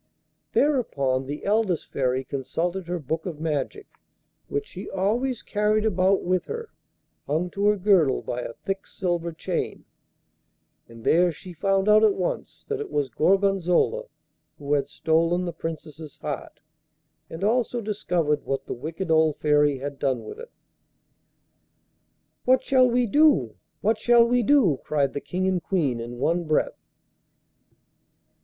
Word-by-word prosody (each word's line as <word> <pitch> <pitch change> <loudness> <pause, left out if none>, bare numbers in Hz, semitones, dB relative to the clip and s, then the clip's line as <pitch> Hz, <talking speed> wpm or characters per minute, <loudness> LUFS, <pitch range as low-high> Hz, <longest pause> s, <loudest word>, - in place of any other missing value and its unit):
Thereupon 140 - +1
the 145 +2 -6
eldest 205 -4 0
Fairy 130 -1 0
consulted 170 +8 -3
her 175 +1 -2
Book 160 +3 -3
of 160 -4 -6
Magic, 160 - -2 0.6
which 425 0 -2
she 195 - -9
always 225 +6 -1
carried 210 +1 +1
about 190 -1 +2
with 185 0 0
her, 460 0 -6 0.6
hung 165 +5 -1
to 200 +1 0
her 210 0 +4
girdle 180 -9 +3
by 125 - -3
a 115 - -6
thick 195 0 -3
silver 175 -2 -2
chain, 165 - -4 1.0
and 115 -1 -13
there 175 +6 +4
she 180 +3 -11
found 195 +4 +1
out 215 +1 +6
at 210 -2 +4
once 180 - -4
that 435 -1 -2
it 435 - -5
was 140 -3 -1
Gorgonzola 195 - +2 0.5
who 145 0 -2
had 145 -1 +1
stolen 165 +4 +1
the 175 - -4
Princess's 160 -2 -7
heart, - - -6 0.7
and 165 +4 -7
also 240 +2 +1
discovered 180 -8 -1
what 135 0 -3
the - - -4
wicked 165 +7 -5
old 160 -2 +3
Fairy 150 -2 +3
had 140 +1 -6
done 130 -4 0
with 435 - -9
it. 475 - -9 2.0
'What 255 +1 +4
shall 255 -2 +4
we 245 +1 +2
do? 260 - +4 0.3
What 215 +1 +1
shall 240 -1 +5
we 245 +1 +2
do?' 225 - +3
cried 140 -3 0
the 145 - -4
King 185 +1 -2
and 185 -2 +1
Queen 150 -11 0
in 120 +1 -6
one 170 +6 0
breath. 155 -1 -1
175 Hz, 150 wpm, -25 LUFS, 150-210 Hz, 2.0 s, out